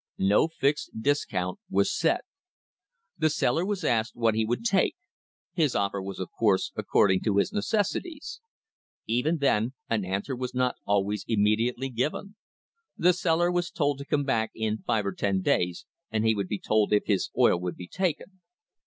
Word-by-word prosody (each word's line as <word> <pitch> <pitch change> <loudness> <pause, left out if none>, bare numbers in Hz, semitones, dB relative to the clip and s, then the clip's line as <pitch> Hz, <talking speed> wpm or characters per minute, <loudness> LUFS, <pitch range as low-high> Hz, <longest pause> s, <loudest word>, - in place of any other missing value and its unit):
No 100 +10 +3
fixed 150 -2 0
discount 110 -9 -1
was 100 +1 +1
set. 165 +7 +2 1.0
The 155 0 +3
seller 150 +1 +1
was 200 0 -2
asked 115 0 0
what 115 -2 +2
he 110 +1 +1
would 120 - -2
take; 195 -5 +2 0.6
his 160 -7 +1
offer 100 -1 0
was, 95 0 -6
of 95 - -5
course, 105 -4 +1
according 95 -2 +2
to 100 -3 0
his 180 - +1
necessities. 220 - -2 0.6
Even 125 +9 +1
then 130 -4 +1 0.2
an 110 -3 +1
answer 100 +8 -3
was 125 0 -5
not 125 0 +1
always 100 0 +1
immediately 115 +4 +1
given. 150 - -3 0.6
The 180 +1 +4
seller 175 -1 +1
was 175 0 0
told 145 -4 0
to 140 - -7
come 145 0 0
back 115 -5 0
in 110 -1 -1
five 105 -2 0
or 100 - 0
ten 95 0 0
days 90 -1 0 0.2
and 110 0 0
he 110 - +4
would 100 -3 -2
be 105 - -2
told 110 +1 +1
if 105 - +3
his 100 -3 0
oil 85 - +4
would 90 0 -4
be 90 - -9
taken. 185 - -3
115 Hz, 170 wpm, -27 LUFS, 100-155 Hz, 1.0 s, The